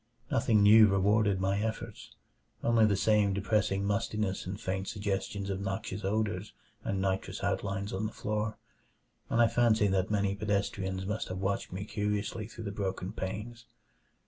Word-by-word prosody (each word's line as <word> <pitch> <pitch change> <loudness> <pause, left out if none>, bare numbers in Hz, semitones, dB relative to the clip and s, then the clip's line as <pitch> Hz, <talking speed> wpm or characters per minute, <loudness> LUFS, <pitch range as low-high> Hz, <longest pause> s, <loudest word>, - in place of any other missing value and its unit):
Nothing 105 -3 +3
new 110 +1 +8
rewarded 100 0 +3
my 95 +1 +1
efforts 105 - -5 0.5
only 115 -2 +4
the 100 - +2
same 105 0 +3
depressing 100 0 +1
mustiness 100 -1 -1
and 95 +2 -4
faint 95 +1 -3
suggestions 100 -1 -2
of 95 0 -3
noxious 100 +1 -4
odors 105 0 -1 0.3
and 100 - -1
nitrous 95 0 -2
outlines 100 0 -2
on 100 +3 -1
the - - -7
floor 105 +1 -2 0.7
and 115 - +1
I 120 - +7
fancy 110 -3 +3
that 95 -1 +1
many 100 -2 +1
pedestrians 100 -2 -1
must 105 +2 -2
have 95 - -4
watched 95 +1 -2
me 95 +2 -4
curiously 105 0 -2
through 115 0 -9
the 100 - -4
broken 95 -2 -3
panes. 105 +5 -5
100 Hz, 155 wpm, -31 LUFS, 95-105 Hz, 0.7 s, new